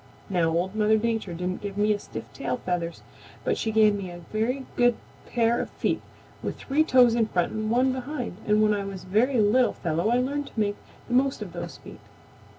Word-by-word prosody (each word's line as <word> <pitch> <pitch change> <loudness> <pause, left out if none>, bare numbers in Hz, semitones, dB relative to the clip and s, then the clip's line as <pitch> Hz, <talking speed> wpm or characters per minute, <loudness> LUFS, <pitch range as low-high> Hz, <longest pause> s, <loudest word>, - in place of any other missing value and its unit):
"Now 170 -3 +2
Old 175 +4 0
Mother 215 0 +3
Nature 220 -5 -1
didn't 180 +2 -3
give 200 -1 -5
me 210 0 +3
stiff - - -7
tail - - -2
feathers, 170 -2 -2 0.4
but - - +1
she 220 - -1
gave 215 -1 +5
me 200 -2 -4
a 175 - -8 0.2
very 250 +5 0
good 245 -1 +4 0.4
pair 235 0 +2
of - - -5
feet - - -1 0.4
with - - -4
three 290 +3 +1
toes 250 -6 +5
in 230 -2 +2
front 175 -4 0
and 215 0 -2
one 255 +3 +3
behind 255 -6 -4
and 210 0 +4
when 210 0 +4
I 200 -1 -1
was 195 -2 -6
a - - -14
very 230 +7 +2
little 220 +4 +4
fellow 170 +4 -1
I 240 - +3
learned 280 +3 -1
to - - -7
make 205 -1 +1 0.3
the 245 - -4
most 265 +2 +2
of - - -10
those - - -6
feet. - - -12
215 Hz, 215 wpm, -26 LUFS, 195-245 Hz, 0.4 s, gave